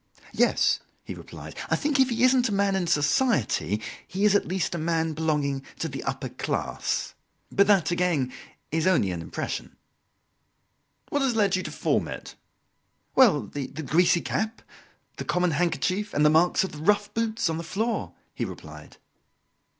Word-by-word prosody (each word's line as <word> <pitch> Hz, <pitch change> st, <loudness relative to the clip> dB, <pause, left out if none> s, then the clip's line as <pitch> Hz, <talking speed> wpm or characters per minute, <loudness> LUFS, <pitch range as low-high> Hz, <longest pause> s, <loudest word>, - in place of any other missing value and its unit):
"Yes," -, -, +3 dB, 0.2 s
he -, -, -6 dB
replied; -, -, -10 dB
"I -, -, +3 dB
think 290 Hz, -2 st, 0 dB
if 265 Hz, -1 st, +5 dB
he 235 Hz, 0 st, 0 dB
isn't 255 Hz, -1 st, +4 dB
a -, -, -3 dB
man 200 Hz, -1 st, +2 dB
in 185 Hz, -2 st, 0 dB
society, 145 Hz, -, +1 dB, 0.3 s
he 195 Hz, +3 st, -1 dB
is, 210 Hz, -, +5 dB
at 205 Hz, -, +2 dB
least, 185 Hz, -1 st, -1 dB
a 170 Hz, -, -2 dB
man 160 Hz, 0 st, 0 dB
belonging 150 Hz, -3 st, -1 dB
to 165 Hz, -, -2 dB
the 135 Hz, -3 st, -6 dB
upper 135 Hz, -1 st, -3 dB
class. -, -, -2 dB, 0.4 s
But 200 Hz, 0 st, +4 dB
that, 195 Hz, -5 st, +4 dB
again, 175 Hz, -8 st, 0 dB, 0.4 s
is 160 Hz, +2 st, +1 dB
only 160 Hz, -, +3 dB
an 85 Hz, -2 st, -4 dB
impression." -, -, -5 dB, 1.3 s
"What 290 Hz, -, 0 dB
has 265 Hz, -4 st, +1 dB
led 205 Hz, -3 st, +3 dB
you 185 Hz, -, 0 dB
to -, -, -6 dB
form -, -, 0 dB
it?" -, -, -7 dB, 0.8 s
"Well, 220 Hz, -, +6 dB
the 140 Hz, -3 st, -5 dB
greasy 160 Hz, +5 st, +2 dB
cap, 220 Hz, +1 st, -3 dB, 0.5 s
the -, -, -4 dB
common 180 Hz, -1 st, +1 dB
handkerchief, 180 Hz, +5 st, -1 dB
and 150 Hz, +1 st, +3 dB
the 150 Hz, -, +6 dB
marks 170 Hz, +4 st, +4 dB
of 190 Hz, -, -4 dB
the 150 Hz, -, -9 dB
rough 205 Hz, +4 st, +2 dB
boots 225 Hz, -3 st, 0 dB
on 160 Hz, 0 st, -1 dB
the -, -, -5 dB
floor," 220 Hz, +7 st, -2 dB, 0.2 s
he -, -, -3 dB
replied. -, -, -9 dB
175 Hz, 170 wpm, -26 LUFS, 150-210 Hz, 1.3 s, Well